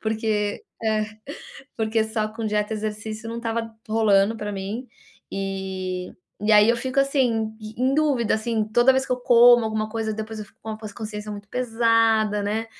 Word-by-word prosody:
porque 215 -2 -1 0.2
eh, 215 -1 +1 0.7
porque 220 0 +1
só 220 -1 -2
com 225 -1 -3
dieta 210 0 0
e - - -3
exercício 215 +1 -5
não 230 - -5
estava 230 -1 -3 0.2
rolando 215 -1 +3
pra 210 -1 -4
mim, 200 +6 -5 0.5
eh, 190 -2 -4 0.3
e 215 +1 +3
aí 210 +1 +7
eu 235 - +2
fico 260 +3 -3
assim 275 -1 +2 0.3
em 215 0 -9 0.2
em - - +1
dúvida 280 -7 +2
assim, 220 0 -1
toda 240 +3 +6
vez 265 0 +1
que - - -1
eu 250 - -2
como 240 -1 +7
alguma 215 0 -2
coisa 220 -1 -2
depois 220 0 -6
eu 210 - -7
fico - - -27
com 220 - -5
a 215 - -5 0.2
consciência 210 -2 -6
muito 205 0 -9
pesada, 225 -3 +2
né, 215 +2 -1
220 Hz, 185 wpm, -24 LUFS, 210-230 Hz, 0.7 s, aí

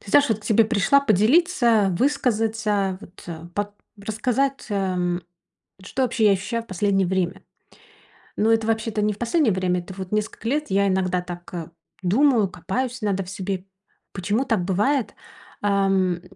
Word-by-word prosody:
Ты 200 - -11
знашь, 290 +5 +5
вот 220 -2 0
к - - -17
тебе 225 0 +4
пришла 230 +6 +3
поделиться, 230 - +3
высказаться, 220 -7 0
вот 180 -2 -14 0.3
под 205 0 -2 0.3
рассказать, 245 +6 -1
эм, 180 -3 -1 0.6
что 250 +7 -3
вообще 235 -3 +2
я 205 - +6
ощущаю 200 +4 -2
в - - -20
последнее 195 0 +1
время. 185 0 -1 1.0
Но 220 +2 +3
это 225 -1 +2
вообще-то 220 -1 0
не 210 0 +1
в - - -13
последнее 240 +2 +2
время, 180 -1 0
это 175 +2 -9
вот 190 0 -7
несколько 215 +1 -2
лет. 295 +5 -1
Я 200 +1 +2
иногда 185 -1 +1
так 175 -2 -7 0.3
думаю, 225 +3 +3
копаюсь 245 +8 -3
иногда 195 -2 0
в 180 - -10
себе. 190 -1 -4 0.5
Почему 205 +7 -1
так 220 -8 +1
бывает? 210 +5 0 0.5
Эм, 195 -3 +2
205 Hz, 155 wpm, -23 LUFS, 190-230 Hz, 1.0 s, я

